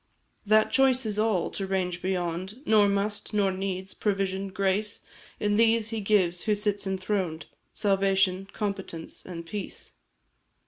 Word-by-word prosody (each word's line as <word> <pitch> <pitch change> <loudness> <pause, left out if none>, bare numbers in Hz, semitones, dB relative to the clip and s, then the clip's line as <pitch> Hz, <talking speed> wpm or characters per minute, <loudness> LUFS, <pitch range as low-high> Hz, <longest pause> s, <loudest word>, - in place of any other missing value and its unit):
"That 215 +1 +4
choice 265 -2 +3
is 210 -1 -1
all 215 -5 +1
to 195 - -4
range 180 -2 -1
beyond 185 - -3
Nor 210 -4 +5
must, 205 +1 -1
nor 200 -2 +3
needs; 190 0 -4
provision, 195 -1 -1
grace, 195 +2 -1 0.4
In 205 0 +1
these 225 -1 +3
He 225 -1 -3
gives, 185 -4 +2
who 215 -2 +3
sits 205 -1 -1
enthroned, 185 -5 -2 0.3
Salvation, 195 -1 +2
competence, 195 -6 -4
and 170 -2 -7
peace." 200 +4 -7
195 Hz, 135 wpm, -27 LUFS, 185-210 Hz, 0.4 s, Nor